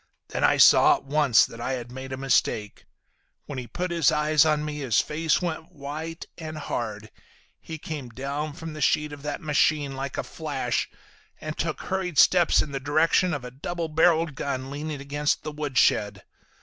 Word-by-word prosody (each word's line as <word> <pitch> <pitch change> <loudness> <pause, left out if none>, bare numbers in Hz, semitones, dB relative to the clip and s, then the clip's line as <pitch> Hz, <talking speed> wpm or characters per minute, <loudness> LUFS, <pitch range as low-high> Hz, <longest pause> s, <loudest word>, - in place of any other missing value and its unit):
Then - - -3
I - - +4
saw, - - +7
at - - -9
once, 140 -4 +4
that 115 - -10
I 130 - -2
had 120 -1 -5
made 130 +1 -8
a 130 - -4
mistake. 115 -6 0 0.6
When 140 -3 -5
he 125 - -7
put 180 +10 -4
his 165 -5 +3
eyes 150 -1 +3
on 150 -1 +1
me 150 -1 -4
his 125 -7 +2
face 160 +3 0
went 165 0 -4
white 155 +2 -6
and 155 -1 -6
hard. 110 -7 -4 0.5
He 160 - -8
came 150 -5 -6
down 140 +5 -4
from 160 +1 -8
the 155 - -7
seat 150 +1 +1
of 145 - -9
that 145 0 -4
machine 150 -2 +1
like 135 0 -5
a - - -1
flash, - - -3 0.5
and 155 0 -5
took 165 -1 -3
hurried 185 -4 -3
steps 175 -2 +5
in 150 - -9
the 135 - -3
direction 155 +6 +2
of 145 -5 -4
a 125 - -7
doublebarrelled 160 +2 +1
gun 135 -1 -4
leaning 150 +1 -5
against 145 +1 -1
the 155 - -4
woodshed. 130 -9 +1
150 Hz, 185 wpm, -25 LUFS, 135-155 Hz, 0.6 s, saw